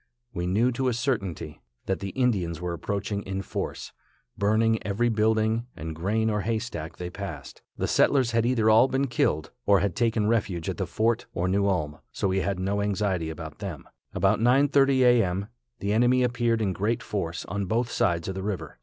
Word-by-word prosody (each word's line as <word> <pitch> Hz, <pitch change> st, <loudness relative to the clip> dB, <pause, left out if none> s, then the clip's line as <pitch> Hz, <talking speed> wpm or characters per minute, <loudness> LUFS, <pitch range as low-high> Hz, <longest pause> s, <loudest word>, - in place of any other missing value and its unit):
We 90 Hz, -2 st, -2 dB
knew 110 Hz, +7 st, +2 dB
to 130 Hz, +2 st, -1 dB
a 125 Hz, -, +1 dB
certainty 115 Hz, -, -3 dB, 0.2 s
that 95 Hz, -, -1 dB
the 100 Hz, -, -4 dB
Indians 95 Hz, -10 st, 0 dB
were 90 Hz, 0 st, -3 dB
approaching 100 Hz, +4 st, -3 dB
in 95 Hz, 0 st, -4 dB
force, -, -, -5 dB, 0.4 s
burning 110 Hz, +2 st, +2 dB
every 110 Hz, +4 st, +1 dB
building 110 Hz, +1 st, +1 dB
and 80 Hz, 0 st, -5 dB
grain 105 Hz, +7 st, 0 dB
or 105 Hz, -1 st, 0 dB
hay 115 Hz, +2 st, 0 dB
stack 85 Hz, -9 st, -6 dB
they 90 Hz, 0 st, -5 dB
passed. 90 Hz, -9 st, -7 dB, 0.2 s
The -, -, -1 dB
settlers 130 Hz, -4 st, +3 dB
had 115 Hz, -1 st, +2 dB
either 120 Hz, -2 st, +2 dB
all 110 Hz, +4 st, +6 dB
been 135 Hz, +1 st, 0 dB
killed, 80 Hz, -, 0 dB, 0.2 s
or 100 Hz, -1 st, +6 dB
had 95 Hz, -2 st, -1 dB
taken 115 Hz, -2 st, +1 dB
refuge 100 Hz, -7 st, 0 dB
at -, -, -3 dB
the -, -, -2 dB
fort 115 Hz, +1 st, 0 dB
or 90 Hz, 0 st, 0 dB
New 100 Hz, +2 st, +2 dB
Ulm, 75 Hz, -6 st, -1 dB
so 100 Hz, -, -1 dB
we 95 Hz, +1 st, +1 dB
had 95 Hz, 0 st, -1 dB
no 100 Hz, +2 st, 0 dB
anxiety 100 Hz, -5 st, 0 dB
about 80 Hz, -1 st, -8 dB
them. 95 Hz, -8 st, -6 dB, 0.2 s
About -, -, +2 dB
9:30 135 Hz, +2 st, +4 dB
a. 120 Hz, -1 st, +6 dB
m. 95 Hz, +3 st, -2 dB, 0.3 s
the 100 Hz, +1 st, 0 dB
enemy 125 Hz, +3 st, +4 dB
appeared 120 Hz, -2 st, +1 dB
in 95 Hz, -3 st, 0 dB
great 105 Hz, +5 st, -1 dB
force, 85 Hz, -5 st, -3 dB
on 100 Hz, -1 st, -3 dB
both 115 Hz, +4 st, 0 dB
sides 85 Hz, -1 st, +1 dB
of 95 Hz, -, -2 dB
the 95 Hz, -, -5 dB
river. 90 Hz, -9 st, -5 dB
100 Hz, 200 wpm, -26 LUFS, 90-115 Hz, 0.4 s, all